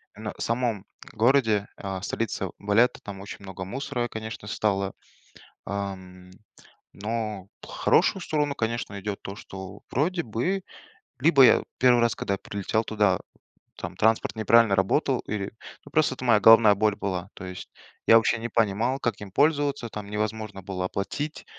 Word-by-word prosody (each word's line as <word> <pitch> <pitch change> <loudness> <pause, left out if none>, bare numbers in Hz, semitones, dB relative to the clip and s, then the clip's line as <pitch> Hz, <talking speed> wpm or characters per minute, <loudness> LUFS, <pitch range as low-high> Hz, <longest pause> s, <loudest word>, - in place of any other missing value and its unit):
именно 105 0 -6
в - - -9
самом 115 -4 -1 0.3
городе, 110 -3 +3
а, 95 -1 -4
в 100 - -6
столице 100 -4 -2
Валетта, 105 +5 +2
там 100 -1 -7
очень 100 - -9
много 95 -1 -7
мусора, 125 +3 -3
конечно, 110 -2 -7
стало, 100 -3 -1 0.7
ам. 95 -2 -6 0.6
Но 105 -2 -4
в - - -11
хорошую 190 - +2
сторону, 150 -3 -1
конечно, 110 -3 -3
идет 100 0 -4
то, 100 - -7
что 95 -1 -9
вроде 170 +6 0
бы, 150 - -1 0.6
либо 140 -1 +6
я 125 - +6
1 125 -1 +5
раз, 120 -1 +2
когда 100 - -1
я - - -9
прилетел 100 +3 -2
туда, 105 -4 +2 0.6
там - - -6
транспорт 110 +1 +2
неправильно 110 -1 +4
работал, 125 +7 +2
или, 100 -1 -4 0.3
ну, 145 - -14
просто 150 -3 +2
это 130 - -7
моя 115 -3 +5
головная 110 -2 +8
боль 105 0 +2
была. 95 -2 -3
То 95 - -8
есть 90 -1 -8 0.4
я 115 - +9
вообще 115 +1 +2
не 115 +1 -4
понимал, 115 +5 +1
как 115 -5 -2
им 100 - -8
пользоваться, 145 -1 +1
там 105 -2 -7
невозможно 105 -1 -3
было 90 -1 -3
оплатить, 120 - -4
110 Hz, 160 wpm, -26 LUFS, 100-120 Hz, 0.7 s, я